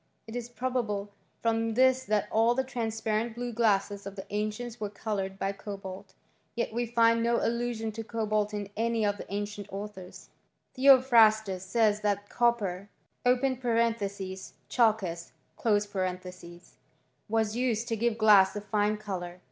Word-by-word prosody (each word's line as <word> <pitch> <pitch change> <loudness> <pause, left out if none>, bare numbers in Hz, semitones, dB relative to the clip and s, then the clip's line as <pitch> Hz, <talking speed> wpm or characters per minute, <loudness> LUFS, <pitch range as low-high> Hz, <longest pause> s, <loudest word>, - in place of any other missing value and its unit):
It 225 - -9
it 240 0 -5
probable 225 -6 -2 0.3
from 225 -1 +1
this 260 +1 +4
that 210 0 +1
all 230 +2 +3
the 265 - +1
transparent 225 -2 -2
blue 240 0 -4
glassel 205 -3 +1
of 200 - -8
the 190 - -7
ancients 215 +3 -3
were 210 -1 -3
coloured 200 -2 -4
by 195 0 -1
cobalt; 195 -2 -8 0.4
yet 235 -2 -2
we 240 +1 -1
find 230 0 +3
no 235 0 +2
allusion 235 -1 -1
to 225 +1 -6
cobalt 215 -2 -1
in 205 -1 -5
any 230 0 0
of 205 0 0
the - - -10
ancient 205 0 -4
authoitl 195 -2 -8 0.5
Theophrastus 230 -7 +5
says 210 +1 +2
that 205 -1 -1
copper 205 -5 0 0.4
{x*^\i^og, 230 -7 0 0.2
chalcos) 210 -8 +1 2.0
was 220 -1 +1
used 235 -2 0
to 225 - -1
give 230 0 0
glass 210 -3 +6
a 205 - -3
fine 210 0 0
colour. 180 -4 -6
220 Hz, 140 wpm, -29 LUFS, 205-235 Hz, 2.0 s, glass